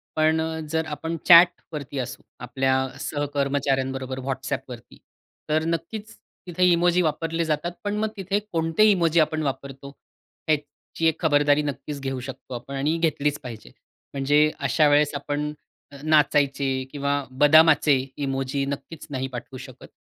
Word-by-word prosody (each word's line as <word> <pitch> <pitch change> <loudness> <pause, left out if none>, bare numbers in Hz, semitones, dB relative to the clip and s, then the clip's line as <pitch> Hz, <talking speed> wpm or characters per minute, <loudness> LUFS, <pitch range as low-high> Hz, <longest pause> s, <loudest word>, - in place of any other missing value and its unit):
पण 160 +1 +2 0.3
जर 160 0 0
आपण 160 +2 -4
चॅटवरती 170 -5 +4
असू 125 - -5 0.2
आपल्या 130 +2 0 0.2
सहकर्मचाऱ्यांबरोबर 135 -2 -2
WhatsAppवरती. 130 -2 -5 0.5
तर 155 +1 +2
नक्कीच 185 +7 -4 0.3
तिथे 180 +1 -1
इमोजी 175 +1 +3
वापरले 165 +1 -1
जातात. 155 +2 -1
पण 205 0 -2
मग 215 +1 0
तिथे 195 +2 -1
कोणते 165 +3 +1
इमोजी 170 -3 +2
आपण 155 0 +1
वापरतो. 135 0 -5 0.6
ह्याची 155 +1 -3
एक 160 - 0
खबरदारी 145 -2 +3
नक्कीच 145 0 -5
घेऊ 135 -1 -3
शकतो 130 0 -9
आपण 135 +3 -7
आणि 150 +4 0
घेतलीच 150 -3 0
पाहिजे. 115 -3 -9 0.4
म्हणजे 145 +2 +3
अशा 140 +2 +2
वेळेस 145 0 +3
आपण 145 +1 -3 0.5
नाचायचे 145 -3 +2 0.2
किंवा 140 0 -1 0.2
बदामाचे 155 0 +6 0.2
इमोजी 135 0 -2
नक्कीच 140 +3 -6
नाही 130 -2 -3
पाठवू 130 +2 -7
शकत. 130 0 -12
145 Hz, 130 wpm, -24 LUFS, 135-160 Hz, 0.6 s, बदामाचे